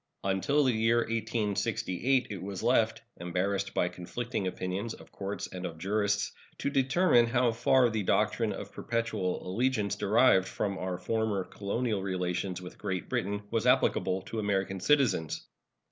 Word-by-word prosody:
Until 100 +10 +2
the 130 -2 +3
year 115 +1 +3
1868 115 +1 0
it 95 -4 -5
was 100 0 -5
left, 115 -2 +2
embarrassed 95 +3 -2
by 90 - +2
conflicting 95 +4 -4
opinions 95 +5 -3
of - - -16
courts 100 +1 -4
and 90 -1 -7
of 85 -3 -5
jurists, 100 +3 0 0.3
to 140 - -2
determine 135 -2 +4
how 120 0 +2
far 120 +2 +4
the 110 -2 -1
doctrine 95 - +1
of - - -6
perpetual 110 -7 -2
allegiance 105 0 0
derived 105 -1 +4
from 100 -2 -2
our 90 -1 -2
former 105 +1 -1
colonial 105 +2 -2
relations 90 -1 -2
with 90 -1 -10
Great 95 -3 -3
Britain 100 +2 -1
was 115 +1 +1
applicable 95 -7 +2
to 110 +3 -5
American 95 -2 -1
citizens. 100 - +2
105 Hz, 145 wpm, -30 LUFS, 95-115 Hz, 0.3 s, determine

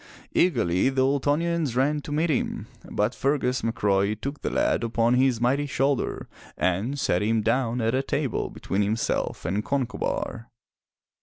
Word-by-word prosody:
Eagerly 115 - +2
the 135 -1 +1
Ultonians 145 +1 +1
ran 145 +4 +2
to 145 - -8
meet 155 +3 +1
him, 135 - -1 0.2
but 105 +4 0
Fergus 130 -2 0
McRoy 100 -2 +1
took 140 +4 -5
the - - -1
lad - - +1
upon 115 +1 +2
his 125 -2 +3
mighty 135 +5 +1
shoulder 135 0 -1 0.3
and 100 +10 0
set 90 -9 +1
him 110 +1 +1
down 120 +1 +1
at 130 +4 0
table 140 -5 -1
between 95 - -2
himself 105 +2 -1
and 100 +3 -1
Concobar. 125 -1 -2
125 Hz, 145 wpm, -25 LUFS, 110-140 Hz, 0.3 s, his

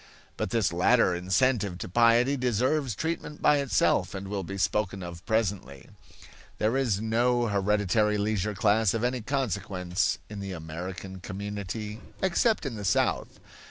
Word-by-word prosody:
But - - -2
this 110 -7 +1
latter 95 +3 +4
incentive 95 +2 +1
to - - -6
piety 120 +6 +4
deserves 125 +1 0
treatment 160 0 -4
by 150 - +4
itself 140 -7 +1
and 95 0 -6
will 100 -1 -2
be 95 +2 -6
spoken 100 0 0
of 85 -1 -8
presently. 100 - -2 0.7
There 110 +4 +1
is 120 -8 +1
no 120 +2 +1
hereditary 105 0 +1
leisure 105 0 -1
class 110 +1 +3
of 115 - -2
any 125 0 0
consequence 100 -8 -1
in 105 -1 -8
the 100 -1 -5
American 90 +4 -7
community, 105 +3 -5 0.2
except 190 +2 +1
in 135 - -3
the 105 - -6
South. 95 - 0
105 Hz, 145 wpm, -27 LUFS, 95-120 Hz, 0.7 s, latter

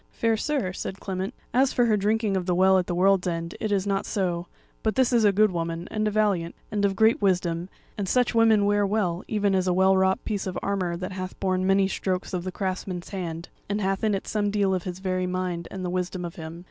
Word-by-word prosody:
"Fair 230 -1 +1
sir," 220 -6 -1
said 190 +1 -5
Clement, 190 0 -3 0.2
"as 265 +2 +3
for 245 - +3
her 220 -2 +3
drinking 210 0 +1
of 185 -1 -2
the 180 - +2
Well 190 +1 +5
at 180 - -2
the 175 - -2
World's 190 0 +3
End, 170 -1 -3
it 215 -2 -2
is 195 -1 +1
not 195 -1 -1
so; 175 -3 -1 0.3
but 220 - 0
this 260 -1 +3
is 235 -2 +4
a 205 - +6
good 210 +1 +3
woman, 170 0 -3
and 215 -1 0
a - - +3
valiant, 200 -6 0 0.2
and 205 -1 -1
of 195 -1 +1
great 220 +2 +4
wisdom; 175 -2 0 0.3
and 195 -2 -2
such 250 -1 +2
women 225 -3 +4
wear 205 0 +3
well, 195 -4 0
even 205 -2 +1
as 185 -1 +1
a 180 - +3
well 190 +1 +4
wrought 190 0 +2
piece 205 -3 -2
of 185 - -3
armour 185 -4 -1
that 185 +1 -5
hath 185 -1 -6
borne 185 -1 0
many 195 0 +4
strokes 190 0 -2
of 180 -1 -2
the 185 - -4
craftsman's 185 -1 -4
hand, 170 -3 -5 0.2
and 205 +1 0
hath 195 0 -1
in 215 -2 +2
it 195 - -5
some 205 -1 0
deal 200 -2 +1
of 185 -2 -2
his 180 -1 -4
very 185 -1 -1
mind 180 -2 -3
and 190 -1 -5
the - - -2
wisdom 180 0 -2
of 170 - -6
him. 160 0 -8
190 Hz, 250 wpm, -26 LUFS, 180-205 Hz, 0.3 s, a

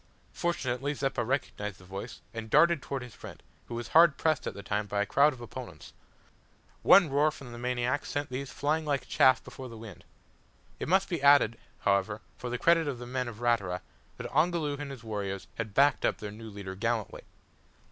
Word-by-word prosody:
Fortunately 145 -4 -1
Zeppa 135 -3 -1
recognised 110 -5 -2
the 90 - -17
voice, 100 +5 -7
and 110 -1 -6
darted 165 +2 +5
towards 135 -1 -4
his 120 - -13
friend, - - -11 0.2
who 120 - -6
was 120 0 -5
hard 165 -2 +6
pressed 160 -1 +1
at - - -4
the 100 - -8
time 105 +2 -2
by 100 0 0
a - - -4
crowd 140 +8 +4
of 130 -4 -11
opponents. 120 -9 -9 0.9
One 195 -4 +7
roar 145 +2 +4
from 140 -5 -10
the 120 - -8
maniac 125 +2 -1
sent 145 0 -3
these 130 +1 -4
flying 155 +3 0
like 145 -3 -1
chaff 130 -1 +4
before 130 -1 -9
the 115 - -10
wind. 110 -5 -11 0.8
It - - -3
must 190 +2 +3
be 170 -5 -3
added, 140 -5 +6 0.3
however, 100 +2 +1
for 125 - -6
the 125 - -2
credit 165 +3 +3
of 140 -3 -2
the 120 - -8
men 125 0 -2
of 120 -1 -8
Ratura, 100 -7 +1 0.4
that - - -6
Ongoloo 155 -1 +1
and 145 -1 -5
his 135 -4 -9
warriors 100 -3 -4
had 110 -3 -5
backed 140 0 +4
up - - +1
their 105 -1 -6
new 110 +1 -9
leader 100 -2 -7
gallantly. 115 +2 -2
125 Hz, 200 wpm, -29 LUFS, 110-145 Hz, 0.9 s, One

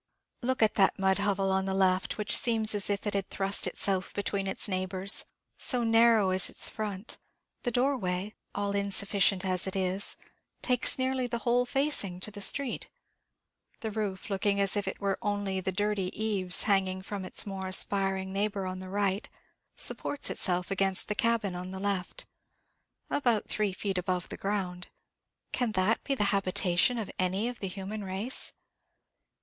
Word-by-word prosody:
Look 255 -1 +1
at 215 - +4
that 190 - +4
mud 190 0 +2
hovel 195 -1 +1
on 190 0 +1
the 190 0 -1
left, 190 0 +2
which 210 -1 +1
seems 220 -2 +3
as 205 -1 +1
if 200 0 -1
it 205 - -1
had 195 -1 -1
thrust 195 +1 +1
itself 195 -1 -1
between 200 -1 -1
its 190 - -1
neighbours, 185 0 0 0.3
so 250 -2 0
narrow 225 -3 +5
is 185 0 +1
its - - +2
front! 210 -1 -4 0.4
The 245 - -1
doorway, 215 -6 0 0.2
all 200 0 -1
insufficient 200 -1 +3
as 185 0 0
it 190 - -3
is, 190 +1 -1 0.5
takes 250 -1 +2
nearly 260 -1 0
the 235 0 -2
whole 245 +1 +3
facing 270 -10 -1
to 215 - -3
the 205 0 -6
street. 265 +6 0 0.9
The 220 - -3
roof, 205 -1 -4
looking 200 +1 +1
as 195 0 +2
if 205 -1 -1
it 190 - -4
were 195 -1 -1
only 205 -3 -1
the 190 - -1
dirty 205 -1 0
eaves 195 -5 +3
hanging 190 -2 +1
from 200 -1 -5
its 185 - -2
more 195 -2 -5
aspiring 190 0 +1
neighbour 200 -1 -1
on 185 0 -4
the 185 0 -8
right, 200 +1 -1 0.5
supports 290 - +1
itself 180 -2 0
against 195 -1 +2
the - - +1
cabin 230 -5 +1
on 180 +1 -5
the 190 0 -6
left, 195 -2 -2 0.9
about 240 -7 +1
three 210 -2 0
feet 190 0 -2
above 180 0 -2
the - - -6
ground. 190 -3 -3 0.6
Can 245 -4 0
that 190 +4 +2
be 275 - 0
the 210 - +2
habitation 190 +3 +3
of 220 -4 -4
any 190 +4 +1
of 245 -1 -5
the 195 - -3
human 200 +3 -5
race? 195 +7 +1
200 Hz, 170 wpm, -29 LUFS, 190-215 Hz, 0.9 s, narrow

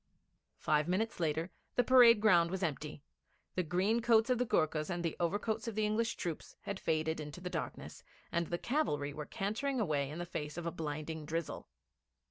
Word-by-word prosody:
Five 150 0 +1
minutes 205 +4 0
later 160 +2 0 0.2
the 245 - +4
parade 240 -4 +7
ground 175 -6 +5
was 190 +1 -3
empty; 150 -2 -3 0.5
the 185 - +1
green 185 +7 +1
coats 230 +1 +4
of 250 - +2
the 250 - +1
Goorkhas 155 -2 +1
and 175 -1 -2
the 165 - -1
overcoats 210 +6 -1
of 225 - -3
the 215 0 +1
English 225 +2 0
troops 170 -3 -5
had 200 -1 -4
faded 160 0 0
into 150 +2 -7
the 180 0 -5
darkness, - - -5 0.3
and 170 -1 0
the 175 - -1
cavalry 150 - -1
were 150 0 -6
cantering 230 +6 -2
away 145 -9 0
in 150 - -6
the 175 - -3
face 150 -3 -5
of 175 - -4
a 170 - -1
blinding 155 0 -4
drizzle. 165 0 -3
175 Hz, 190 wpm, -34 LUFS, 155-220 Hz, 0.5 s, parade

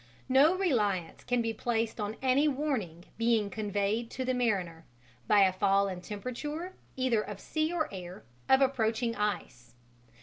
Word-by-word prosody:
"No 280 +7 +5
reliance 210 - 0
can 245 -1 0
be 225 0 -1
placed 225 0 -1
on 210 +1 -3
any 265 +3 +4
warning 255 - -2
being 230 -3 +2
conveyed 210 +2 -1
to 260 - -4
the 255 - +1
mariner, 190 -10 -1 0.4
by 205 - +5
a 190 -1 +3
fall 195 +1 +2
in 185 -2 -5
temperature, 295 - -5 0.2
either 255 -4 +1
of 205 -2 -7
sea 310 +7 -1
or 340 -3 0
air, 180 -1 -8 0.3
of 265 +1 +6
approaching 230 -3 +1
ice. 200 - -3
225 Hz, 155 wpm, -30 LUFS, 200-260 Hz, 0.4 s, of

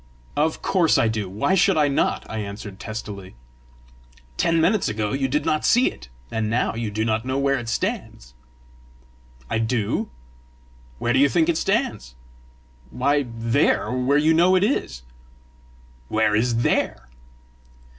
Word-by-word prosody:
"Of 155 +2 0
course 175 -4 +3
I 115 - +3
do: 110 -3 -2
why 105 - 0
should 190 -1 +3
I 150 -1 +4
not?" 140 - 0
I 110 - -5
answered 100 -1 -7
testily. 105 - -7 1.0
"Ten 165 - +1
minutes 185 - +2
ago 105 -1 -2
you 135 0 0
did 145 +3 -1
not 155 -1 0
see 245 +2 +3
it, 65 -1 -14 0.2
and 110 -1 -1
now 120 +3 0
you 115 -1 -3
do 110 +2 -2
not 110 0 0
know 130 +1 -2
where 140 -1 +1
it 120 -1 -6
stands!" - - -4 1.1
"I 110 - -1
do." 115 -2 -1 0.9
"Where 120 - 0
do 130 - +3
you 140 +1 +5
think 165 +1 +2
it 165 - +1
stands?" 210 - -1 0.7
"Why 140 - 0
THERE, 115 0 +1
where 130 +3 +1
you 155 +2 +3
know 175 +3 +4
it 185 - +3
is!" 65 - -1 1.0
"Where 110 +3 +1
is 115 +1 +1
THERE?" - - 0
120 Hz, 155 wpm, -23 LUFS, 110-155 Hz, 1.1 s, you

